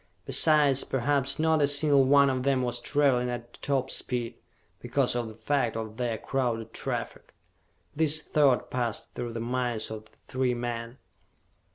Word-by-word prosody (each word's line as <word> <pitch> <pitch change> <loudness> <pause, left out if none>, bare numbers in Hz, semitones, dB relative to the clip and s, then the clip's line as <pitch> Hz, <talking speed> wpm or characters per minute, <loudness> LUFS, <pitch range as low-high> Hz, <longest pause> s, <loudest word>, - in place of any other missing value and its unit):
Besides, 150 -4 +4
perhaps 140 +1 0
not 160 0 +2
a 145 - +4
single 145 -1 +4
one 140 +1 +5
of 130 -1 -2
them 135 -1 +1
was 120 -1 -2
traveling 135 -4 +1
at 120 -1 -7
top 135 -2 -1
speed, 120 -2 -2 0.5
because - - 0
of 120 -1 -2
the 110 - -10
fact 115 0 -1
of 110 -1 -6
their 120 -3 -2
crowded 115 -4 -3
traffic. - - -5 0.6
This 155 0 +2
thought 145 -4 +1
passed 120 -3 -3
through 120 -1 -6
the 115 - -4
minds 120 -2 -2
of 110 0 -7
the - - -30
three 130 -1 -2
men. 120 0 -5
125 Hz, 160 wpm, -27 LUFS, 120-140 Hz, 0.6 s, one